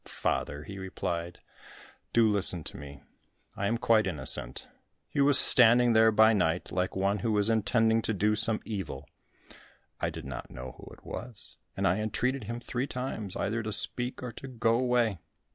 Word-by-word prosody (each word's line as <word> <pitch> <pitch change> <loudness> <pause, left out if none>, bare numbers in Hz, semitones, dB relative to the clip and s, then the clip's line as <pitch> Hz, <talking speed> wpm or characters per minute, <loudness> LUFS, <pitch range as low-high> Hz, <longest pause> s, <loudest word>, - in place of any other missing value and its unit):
"Father," 70 +1 -3
he 100 +3 -9
replied, 85 -2 -5 0.7
"do 115 -1 +4
listen 95 -5 +4
to - - -4
me. 70 -1 -11 0.5
I 100 - -2
am 115 +3 0
quite 115 -2 +2
innocent. 65 -3 -1 0.4
He 140 - -2
was 140 0 +5
standing 120 -2 +6
there 110 0 +5
by 110 +1 +5
night 90 -4 -1
like 90 0 -2
one 100 +2 0
who 110 +1 -1
is 105 +2 +2
intending 115 0 +2
to 110 - -2
do 105 +2 +1
some 110 0 +3
evil. 85 -10 -6 0.9
I - - -1
did - - -9
not 65 -3 -7
know 65 +1 -9
who - - -12
it - - -17
was, 120 -4 -9 0.2
and - - +1
I 90 +5 +1
entreated 120 +4 -2
him 115 +3 -5
three 125 +2 -4
times 120 -7 -5
either 110 +3 -2
to 110 0 -5
speak 120 +4 0
or 125 - -5
to 135 - -10
go 115 -3 0
away." 120 -5 +1
110 Hz, 180 wpm, -28 LUFS, 95-115 Hz, 0.9 s, standing